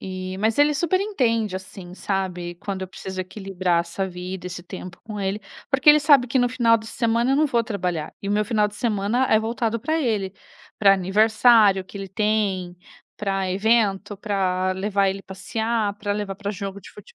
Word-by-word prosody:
E, 185 0 -5
mas 220 +5 0
ele 295 0 +4
super 345 +5 +1
entende, 230 - 0
assim, 185 -1 -10
sabe, 180 -3 -3
quando 190 0 -5
eu 185 - -5
preciso 190 0 -8
equilibrar 185 -2 -1
essa 170 +3 -3
vida, 180 0 -7
esse 180 -1 -6
tempo 180 -1 -9
com 215 -2 -7
ele, 195 +2 -2 0.3
porque 270 +1 +3
ele 300 0 +9
sabe 285 -4 +5
que 260 +2 +1
no 245 -1 +3
final 230 -2 +4
de 220 0 -9
semana 235 +2 0
eu - - +3
não 305 +1 +3
vou 235 -4 +1
trabalhar, 180 -8 -3
e 200 - -4
o - - +1
meu 210 0 +2
final 210 -1 +1
de 210 - -14
semana 225 +2 0
é 220 - +6
voltado 230 0 -2
para 315 +6 0
ele, 205 -8 -1 0.4
para 195 -2 +6
aniversário 210 +1 +4
que 200 - -12
ele 195 -1 -6
tem, 195 -3 -1 0.4
para 195 -2 -1
evento, 205 0 +1
para 185 -3 0
levar 195 +1 +1
ele 195 +1 -3
passear, 220 +2 -2
para 205 0 -3
levar 205 -2 -3
para 205 0 -4
jogo 200 -1 -6
de - - -13
fute 210 - -15
205 Hz, 195 wpm, -23 LUFS, 190-230 Hz, 0.4 s, ele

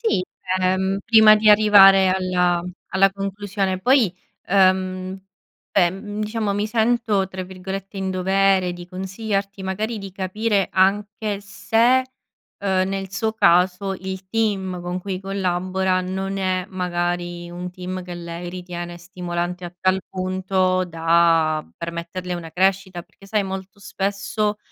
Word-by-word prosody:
Sì, 445 - +1 0.4
ehm, 190 +1 +1
prima 220 -1 +7
di 215 0 +5
arrivare 195 -2 +7
alla 180 -2 +1 0.3
alla 195 0 +4
conclusione. 195 -1 -2
Poi, 245 -7 +3 0.3
ehm, 185 0 +2 0.5
beh, 175 -3 +3
mhmm, 205 +3 -6
diciamo 215 -1 -1
mi 205 +1 0
sento 220 -3 +1
tra 185 0 -6
virgolette 190 +2 -7
"in 190 -1 -2
dovere" 190 0 +2
di 175 0 -9
consigliarti 195 +1 -4
magari 210 +4 -3
di 195 -1 -7
capire 200 +2 0
anche 205 +2 +1
se, 225 +4 +2 0.6
ehm, 190 -1 +1
nel 195 -1 -4
suo 220 +2 -1
caso 185 0 +3
il 190 0 -7
team 195 -5 -1
con 175 +1 -4
cui 185 0 -4
collabora 185 -1 0
non 190 +1 -3
è 185 -1 0
magari 175 -1 -3
un 180 +1 -6
team 185 +1 -6
che 180 - -7
lei 170 0 -6
ritiene 175 -1 -6
stimolante 175 0 -4
a 175 - -11
tal 185 +1 +2
punto 185 0 0
da 165 -2 +2
permetterle 170 +2 -5
una 165 -2 -7
crescita. 185 0 0
Perché 195 - -19
sai 210 0 +1
molto 190 +1 -6
spesso 205 +2 -2
190 Hz, 135 wpm, -22 LUFS, 180-200 Hz, 0.6 s, prima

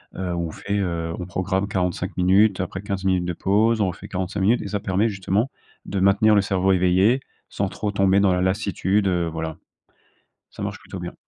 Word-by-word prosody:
heu, 90 -1 -3
on 85 -2 -3
fait, 100 +5 -3
heu, 85 -3 -2
on 90 - -4
programme 95 +2 -1
45 90 -2 -2
minutes, 95 +2 +4
après 95 +1 -4
15 100 -1 -4
minutes 95 -2 +1
de 90 - -2
pause. 110 +6 +2
On 100 - +3
refait 90 - -6
45 95 +1 -3
minutes, 110 +6 +3
et - - -5
ça 105 - -1
permet, 100 +3 +1
justement, 100 +4 -1 0.4
de 100 - -3
maintenir 100 +3 +4
le 100 - +5
cerveau 95 -1 +1
éveillé, 95 +6 +3 0.3
sans 100 - -1
trop 105 +1 -3
tomber 100 -1 +3
dans 100 -2 +3
la 90 - 0
lassitude, 100 +1 0
heu, 90 -2 +1
voilà. 80 -1 -4 0.9
Ça - - -8
marche - - -4
plutôt - - -9
bien. - - -6
95 Hz, 200 wpm, -23 LUFS, 90-100 Hz, 0.9 s, le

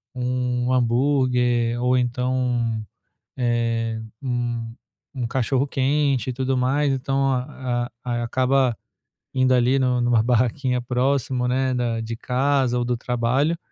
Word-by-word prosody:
um 125 0 -1
hambúrguer 125 -1 +2
ou 125 +1 +3
então, 125 -2 0 0.5
eh, 115 -2 0 0.2
um 120 -3 -3 0.4
um 125 -2 -2
cachorro-quente 135 +1 0
e - - -2
tudo 130 +1 -1
mais. 135 +2 +1
Então, 135 +1 0
a 125 -2 -3
a 120 -1 -2
acaba 130 0 +1 0.6
indo 130 -1 +3
ali 125 +2 +3
no 125 -1 +1
numa 120 -2 +3
barraquinha 125 +1 +1
próximo, 125 0 0
né, 130 +1 +1
da 120 -2 -1
de 115 +1 -4
casa 130 0 +1
ou 120 - -1
do 125 0 0
trabalho, 125 +7 0
125 Hz, 120 wpm, -23 LUFS, 120-130 Hz, 0.6 s, ou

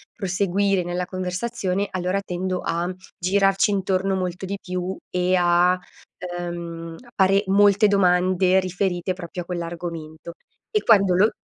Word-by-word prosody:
proseguire 195 -1 0
nella 175 +1 -2
conversazione, 185 +1 -2
allora 185 +1 -1
tendo 185 -1 -3
a 170 +1 -1 0.3
girarci 195 +2 +2
intorno 195 -1 0
molto 180 0 -3
di 200 +1 -4
più 180 +1 -3
e 180 +1 +1
a, 175 0 +4 0.6
uhm, 170 -1 -6 0.2
pare 195 +1 +4
molte 205 +2 +5
domande 185 -1 +3
riferite 185 0 -1
proprio 180 0 -7
a - - -24
quell'argomento 170 -2 -6 0.4
e 425 -2 +1
quando 195 -5 +5
lo 205 +4 +5
185 Hz, 125 wpm, -23 LUFS, 175-195 Hz, 0.6 s, molte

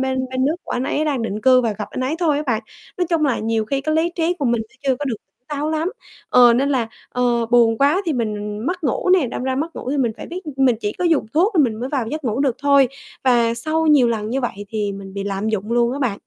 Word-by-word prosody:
bên 260 0 -1
bên 260 0 0
nước 310 +4 +1
của - - -5
anh 250 +1 -1
ấy 305 +3 0
đang 275 -6 -1
định 215 -1 -3
cư 255 +1 +5
và 230 -3 0
gặp 210 +1 -5
anh - - -5
ấy 260 +5 -1
thôi 315 -5 +2
á 300 - -1
bạn. 230 -2 0 0.3
Nói 355 -1 0
chung 320 -3 +2
là, 265 -4 +1
nhiều 225 0 0
khi 275 +4 -1
cái 310 +2 -1
lý 330 +2 +2
trí 340 +1 0
của 285 - -2
mình 235 -2 +2
nó - - -27 0.2
chưa 255 - +2
có 290 - -3
được 240 -5 -2 0.3
táo 295 +1 -2
lắm 320 +4 -1 0.4
ờ, 245 -1 +7
nên 275 +3 +1
là, 250 -5 0 0.2
ờ, 240 -2 0
buồn 230 -2 +4
quá 295 +8 +3
thì 320 - +1
mình 210 -3 -3
mất 360 -2 -2
ngủ 275 +7 0
nè. 360 -8 +4
Đâm 245 - -5
ra 260 0 -1
mất 325 +4 -3
ngủ 255 - -4
thì 290 - 0
mình 240 -5 +1
phải - - -8
biết 360 +2 -6 0.2
mình 260 -4 +3
chỉ 205 - -2
có 360 - -4
dùng 325 -9 +2
thuốc 380 +8 +3
thì - - +7
mình 230 -4 -1
mới 255 - -3
vào 270 -5 -1
được 225 - -6
giấc 310 -1 -4
ngủ 235 +3 -1
được 265 -3 +1
thôi 280 -2 +4 0.4
và 235 -2 +3
sau 315 +6 -1
nhiều 280 -6 +5
lần 220 -1 -2
như 270 +2 0
vậy 240 - -2
thì 210 -2 -2
mình 195 -1 -9
bị 200 0 -4
lạm 200 +2 -2
dụng 215 +1 -2
luôn 240 0 +2
á 280 - -4
bạn. 240 -8 0
255 Hz, 290 wpm, -20 LUFS, 230-295 Hz, 0.4 s, ờ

